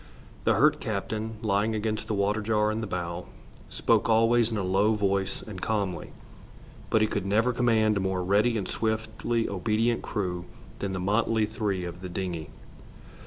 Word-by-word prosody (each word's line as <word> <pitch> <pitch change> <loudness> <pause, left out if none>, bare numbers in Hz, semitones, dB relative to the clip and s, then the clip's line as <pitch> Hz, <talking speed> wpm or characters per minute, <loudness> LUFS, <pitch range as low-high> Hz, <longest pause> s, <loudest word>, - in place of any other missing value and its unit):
The - - +4
hurt - - +4
captain, 110 +1 -3
lying 105 +1 +1
against 110 0 -2
the 110 - -1
water 100 +2 +1
jar 105 0 +2
in 110 +1 -2
the 110 - -3
bow, 90 -2 -4 0.4
spoke - - +2
always 115 +1 +4
in 110 - -1
a 100 - -1
low 100 +4 +3
voice 100 -2 0
and 100 -4 -8
calmly, 100 -5 -1 0.8
but 110 - +3
he - - +3
could 100 -2 -2
never 115 +5 +2
command 110 -3 +3
a - - +1
more 95 -1 -1
ready 105 +5 +3
and 100 - -3
swiftly 110 +1 -1
obedient 110 +4 0
crew 90 -5 -3 0.3
than 100 -1 -2
the 95 - -2
motley 110 +3 +2
three 105 -3 -2
of 90 +1 -7
the 90 - -6
dingey. 90 -4 -4
105 Hz, 170 wpm, -27 LUFS, 95-110 Hz, 0.8 s, The